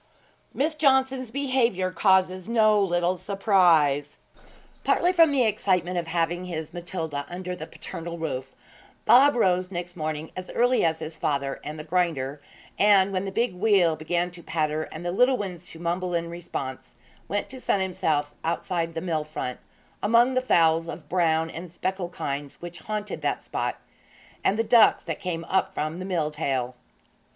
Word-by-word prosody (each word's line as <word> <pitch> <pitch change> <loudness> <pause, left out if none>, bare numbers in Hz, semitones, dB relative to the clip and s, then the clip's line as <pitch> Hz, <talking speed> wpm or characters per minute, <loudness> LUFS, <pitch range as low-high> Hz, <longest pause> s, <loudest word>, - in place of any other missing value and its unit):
XIX. - - -34
MISS 310 +3 +1
JOHNSON'S 265 -4 +2
BEHAVIOUR 245 -8 0
CAUSES 185 0 +2
NO 215 -2 +4
LITTLE 175 -1 +1
SURPRISE 175 -8 +2 0.7
Partly 355 +1 +2
from 330 -4 +6
the 270 -3 +3
excitement 185 -5 +1
of 170 - -5
having 170 +2 -1
his 160 -3 -5
Matilda 170 -5 -4
under 180 +1 -5
the 160 -3 -8
paternal 170 +1 -7
roof, 135 -5 -4 0.5
Bob 280 +3 +7
rose 185 -5 +2
next 175 -1 -6
morning 155 -1 -4
as 185 0 -6
early 245 +1 +3
as 160 -1 +2
his 160 0 -7
father 140 -2 -1
and 150 +1 -6
the 155 - -6
grinder, 150 -5 -1 0.4
and, 200 -1 +5
when 185 +1 -1
the 195 - -4
big 235 +1 0
wheel 180 -4 +3
began 170 +3 -1
to 175 0 -11
patter 155 -1 -1
and 160 +3 -8
the 175 - 0
little 250 +7 +3
ones 185 -6 -6
to - - -10
mumble 175 +1 -2
in 170 0 -2
response, 135 -6 -6 0.3
went 205 0 -2
to 260 - -8
sun 205 - +1
himself 155 -6 -1
outside 165 0 -2
the 165 - -2
mill 160 -4 -1
front, 150 -4 -5 0.4
among 235 +4 +4
the 255 - +2
fowls 165 -8 +3
of 160 -2 -8
brown 165 -3 +2
and 170 +2 -7
speckled 185 0 -3
kinds 140 -4 -5
which 175 0 -8
haunted 210 -1 -4
that - - 0
spot, - - -3 0.6
and 200 - +2
the 225 - +2
ducks 230 0 +5
that 165 -3 -4
came 170 -2 -3
up 190 +2 0
from 155 +3 -3
the 185 - -5
mill 165 -5 -1
tail. 135 -5 -2
175 Hz, 170 wpm, -26 LUFS, 160-200 Hz, 0.7 s, Bob